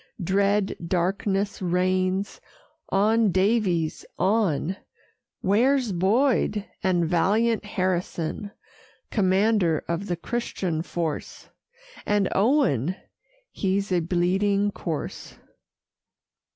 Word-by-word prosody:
Dread 200 +2 +1
darkness 195 +3 -1
reigns. 185 +2 0 0.5
On, 215 +2 +3
Daviess, 185 -4 +1
on. 190 -4 +1 0.6
Where's 240 +4 +2
Boyd? 210 +3 +1 0.2
And 180 -4 +2
valiant 210 +7 +2
Harrison, 185 -1 -2 0.6
Commander 190 -4 +2
of 170 +4 -2
the 175 - -1
Christian 185 -6 -3
force? 165 -2 -4 0.5
And 205 -2 +1
Owen? 195 - +2 0.6
He's 195 0 -1
a 180 - +3
bleeding 190 +4 +1
corse! 165 -6 -5
190 Hz, 80 wpm, -25 LUFS, 175-210 Hz, 0.6 s, On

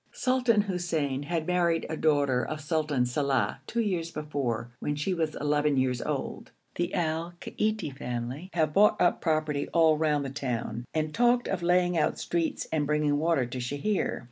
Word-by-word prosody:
Sultan 250 -4 +2
Hussein 170 -8 -1
had 160 +2 -2
married 170 -2 +1
a 160 - -3
daughter 145 -5 +2
of 155 +5 -4
Sultan 150 -3 0
Salàh 135 +2 0
two 235 - 0
years 180 -6 -1
before, 140 -7 -3
when 145 - -2
she 150 +6 -1
was 160 -3 -1
eleven 145 -1 +1
years 130 -2 +1
old. - - -4 0.2
The 175 +1 -2
Al 165 0 -1
Kaiti 215 -10 -2
family 125 +6 -5
have 155 -3 +1
bought 210 +3 +5
up 175 - +2
property 155 -3 0
all 160 -2 +5
round 150 -3 +1
the 135 - -4
town, 120 -4 -3
and 155 -1 -1
talked 240 +1 +3
of 190 -2 -2
laying 175 0 +3
out 150 - +1
streets 170 -1 -2
and 150 -2 0
bringing 150 -1 +1
water 160 -5 +2
to 125 +2 -6
Sheher. 145 +11 -1
155 Hz, 170 wpm, -28 LUFS, 140-175 Hz, 0.2 s, bought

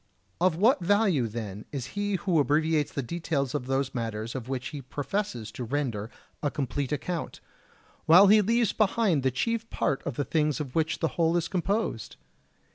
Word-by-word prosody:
Of 180 -1 +3
what 220 +10 +4
value, 185 - +2
then, 105 -2 -6
is 135 -5 -4
he 205 0 -1
who 180 -3 +1
abbreviates 150 +1 +2
the 140 - -3
details 145 -2 -2
of 135 -4 -3
those 135 0 0
matters 115 -1 -3
of 130 -2 -6
which 130 -2 -3
he 145 - -7
professes 135 - -3
to 125 - -6
render 120 -5 -2 0.3
a 145 - +1
complete 140 -1 -3
account, 165 +4 -3 0.7
while 175 +5 +9
he 210 +2 +7
leaves 230 +2 +2
behind 205 -7 +2
the 130 - +2
chief 230 - -2
part 135 - -1
of 140 - -4
the 145 - -1
things 150 -2 +1
of 135 -4 -5
which 160 0 0
the 165 - +2
whole 165 +1 +3
is 170 -1 -1
composed? 185 - -2
150 Hz, 180 wpm, -27 LUFS, 130-185 Hz, 0.7 s, while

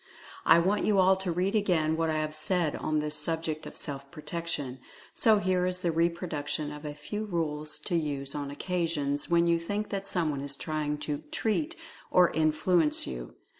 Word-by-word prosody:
I - - +8
want 190 +5 +2
you 210 -2 +3
all 190 0 +6
to 190 -2 -2
read 180 +4 0
again 175 -7 +2
what 165 0 0
I 155 - 0
have 155 0 -2
said 155 0 0
on 155 - -1
this 150 0 -1
subject 160 0 -3
of - - -10
Self 140 -1 -5
Protection. 150 -4 -3 0.3
So 220 -2 +5
here 185 -2 +1
is 185 0 -1
the 170 - +1
reproduction 160 -3 -1
of 150 +1 -8
a 145 -1 -5
few 210 +8 -4
rules 155 -5 -2
to 175 - -2
use 140 -4 -1
on 145 -1 -4
occasions 150 -3 -1
when 170 0 +4
you 170 0 +3
think 205 +5 -3
that 195 -1 -3
someone 155 -7 0
is 140 0 +1
trying 150 0 -2
to 150 -1 -1
so 150 - -15
"treat" 300 - 0 0.3
or 180 -1 +5
"in 155 -1 +3
fluence 160 0 +2
you. - - -6
160 Hz, 195 wpm, -29 LUFS, 150-180 Hz, 0.3 s, I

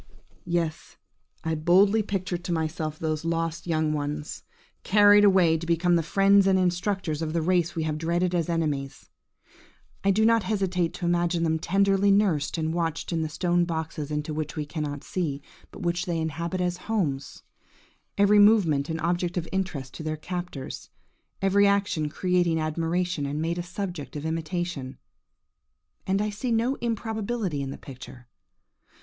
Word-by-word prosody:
Yes! 170 -2 -2 0.5
I 160 - -1
boldly 185 +7 +4
picture 190 -3 -3
to 175 0 -5
myself 160 -1 -2
those 155 -1 -2
lost 165 0 -2
young 155 -2 +1
ones, 150 0 -4 0.4
carried 205 0 +6
away 180 -5 +5
to 165 - -7
become 170 +1 +2
the 170 - +3
friends 195 +3 +4
and 190 -1 +4
instructors 180 -3 0
of 155 -1 -2
the 170 - +1
race 175 -1 +1
we 165 - -1
have 155 -1 -2
dreaded 175 +2 0
as 170 -1 0
enemies. 150 -5 -2 0.9
I 195 - +2
do 215 +3 +3
not 230 0 +4
hesitate 185 -4 -1
to 175 - -4
imagine 175 0 +1
them 160 -1 +1
tenderly 195 +3 +2
nursed 190 -7 +2
and 160 0 -1
watched 165 0 -2
in 165 - 0
the 160 - -2
stone 175 +2 +1
boxes 160 -3 -4
into 150 +1 -3
which 155 0 -4
we 150 -2 -3
cannot 145 -2 -4
see, 155 -7 -2 0.3
but - - -10
which 175 +1 -1
they 170 -1 -1
inhabit 170 +3 -2
as 180 -1 -1
homes–every 200 +3 -1
movement 180 -10 +4
an 160 0 -2
object 175 +1 -1
of 170 -1 -2
interest 170 -9 -3
to - - -8
their 155 0 -3
captors, 175 -3 -6 0.5
every 200 +1 +4
action 200 -6 +1
creating 175 0 +1
admiration, 165 0 -1
and 145 +2 -3
made 165 +2 -1
a - - 0
subject 175 -4 -6
of 150 +1 -5
imitation–and 160 - -6
I 210 - -2
see 235 +5 -3
no 230 +3 +2
improbability 220 -7 -2
in 135 - -4
the - - -6
picture! 130 -2 -11
170 Hz, 160 wpm, -26 LUFS, 155-190 Hz, 0.9 s, carried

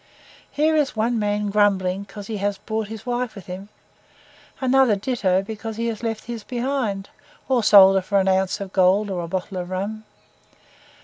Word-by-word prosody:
Here 310 +2 +1
is 295 -5 +1
one 225 +2 0
man 205 0 -1
grumbling 195 -2 +2
because 200 0 -9
he 215 +1 -4
has 200 0 -1
brought 220 0 -3
his 220 +1 -9
wife 245 -1 -2
with 195 -4 -10
him, 190 +3 -8 0.9
another 260 -3 +4
ditto 195 -4 0
because 220 +1 -6
he 230 - -2
has 220 -2 -5
left 225 -2 -3
his 235 -2 -6
behind, 240 -6 -2 0.4
or 260 -2 +2
sold 195 -2 +8
her - - +2
for 200 +2 +1
an 190 - +1
ounce 190 +2 +1
of 195 -1 -7
gold 195 +2 +3
or 180 -2 -2
a - - -5
bottle 185 +2 -4
of 180 0 -4
rum. 200 +4 -4
205 Hz, 185 wpm, -22 LUFS, 195-230 Hz, 0.9 s, sold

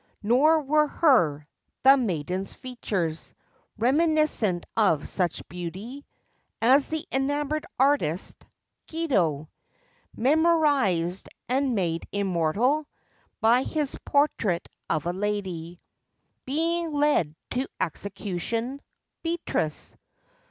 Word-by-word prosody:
Nor 295 +8 +4
were 300 +2 +3
her—the 250 - +2
maiden's—features 190 - -3 0.4
Reminiscent 270 - +2
of 190 -9 +2
such 180 -4 -2
beauty, 190 - -7 0.5
As 265 +5 +5
the 315 -1 -3
enamored 290 +4 -1
artist, 265 - +1 0.5
Guido, 185 - 0 0.7
Memorized 270 - +2 0.2
and 260 0 +1
made 170 -4 -1
immortal 200 - +1 0.5
By 235 +3 +5
his 295 0 -2
portrait 230 - +1 0.2
of 155 - 0
a 175 - -1
lady 185 -4 -3 0.7
Being 330 +4 0
led 285 - +2 0.2
to 260 +2 -1
execution— 205 - -3 0.4
Beatrice. 330 - -2
235 Hz, 80 wpm, -26 LUFS, 175-290 Hz, 0.7 s, As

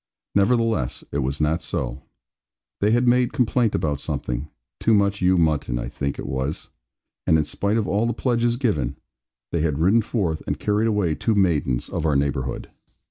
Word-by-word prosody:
Nevertheless, 110 - +1
it 70 - -1
was 70 +1 -2
not 80 +2 +1
so; 60 +1 -3 0.8
they 105 - +2
had 120 +2 +3
made 125 0 +3
complaint 120 -2 +2
about 75 -3 -1
something 60 +4 -3 0.3
too 115 - +3
much 100 -1 +1
ewe 90 0 +4
mutton, 75 -7 +1
I - - -4
think 70 -1 -3
it - - -6
was 65 +2 -3 0.6
and 80 - +5
in 80 - +2
spite 100 +8 -1
of 110 - 0
all 105 +4 +1
the 120 - 0
pledges 120 0 +1
given, 95 - 0 0.6
they 85 - 0
had 75 -3 0
ridden 95 +9 +4
forth, 95 -8 -1
and - - -1
carried 105 +2 +1
away 105 -7 +1
two 110 +8 0
maidens 75 -10 +1
of 80 -1 -2
our 75 - +2
neighbourhood. 70 -2 -1
85 Hz, 180 wpm, -23 LUFS, 70-110 Hz, 0.8 s, and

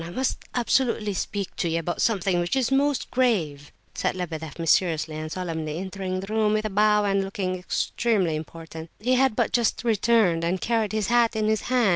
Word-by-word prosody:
I 165 - -7
must 255 +9 -1 0.2
absolutely 235 -4 +1
speak 200 +1 -4
to 170 - 0
you 165 - 0
about 170 +1 -2
something 195 -5 +1
which 175 +8 -1
is 265 -1 +1
most 280 0 +1
grave," 165 - 0 0.2
said - - -1
Lebedeff, 160 -4 -5
mysteriously 165 -1 +1
and 155 0 -5
solemnly, 160 -4 -4
entering 185 0 -4
the 195 +3 -6
room 215 -1 +2
with 215 0 0
a 215 - -2
bow 210 +1 +3
and 195 -1 +1
looking 195 -1 -3
extremely 185 -1 0
important. 160 +1 -8
He 250 +4 +1
had 260 -2 +3
but - - 0
just 235 -1 +1
returned, 220 -6 +2
and 175 +3 0
carried 225 -1 0
his 215 -2 -1
hat 235 -1 +3
in 215 -1 0
his 215 0 +1
hand. 250 -4 +3
195 Hz, 195 wpm, -25 LUFS, 170-225 Hz, 0.2 s, bow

